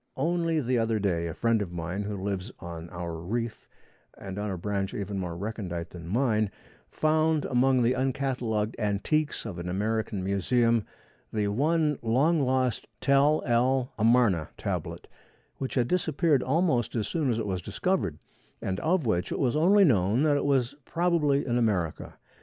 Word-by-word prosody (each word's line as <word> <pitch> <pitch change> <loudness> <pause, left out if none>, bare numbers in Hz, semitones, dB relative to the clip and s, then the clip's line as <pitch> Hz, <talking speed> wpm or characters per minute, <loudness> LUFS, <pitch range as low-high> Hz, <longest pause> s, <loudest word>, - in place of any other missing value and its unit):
Only 165 -1 +1
the 125 -3 +1
other 115 -1 +1
day, 90 -5 0
a 80 - -4
friend 115 -2 +2
of 95 -4 -4
mine 90 +3 -4
who 105 0 -4
lives 95 -2 -3
on 85 -1 -8
our 85 -1 -5
reef, 110 +7 -4 0.5
and 95 0 -6
on 105 0 -2
a 95 - -3
branch 100 +1 -2
even 100 -1 -3
more 85 -2 -4
recondite 90 -4 -5
than 85 -2 -9
mine, 110 0 +1 0.4
found 155 0 +1
among 130 0 +3
the 120 +2 +3
uncatalogued 125 -5 -1
antiques 110 +10 0
of 95 -6 -5
an 85 +1 -4
American 105 +1 -1
museum 115 +4 +2 0.5
the 105 -2 0
one 150 +6 +1
long 140 +8 +2
lost 130 -2 0
Tel 140 +3 +3
el 125 +2 +2
Amarna 110 -8 +3
tablet, - - -4 0.5
which 135 - -4
had 120 -3 +2
disappeared 160 -4 +2
almost 135 -5 +1
as 110 -2 -1
soon 155 -5 0
as 115 - +1
it 115 - -2
was 95 -3 -2
discovered, 100 - -1 0.4
and 95 0 -3
of 165 - +1
which 90 -5 0
it - - -1
was 130 0 +1
only 190 +6 +5
known 110 - +3
that 150 -2 +3
it 145 - 0
was 135 -2 +2
probably 165 -4 +1
in 120 -1 +1
America. 95 -9 -1
115 Hz, 165 wpm, -28 LUFS, 100-140 Hz, 0.5 s, only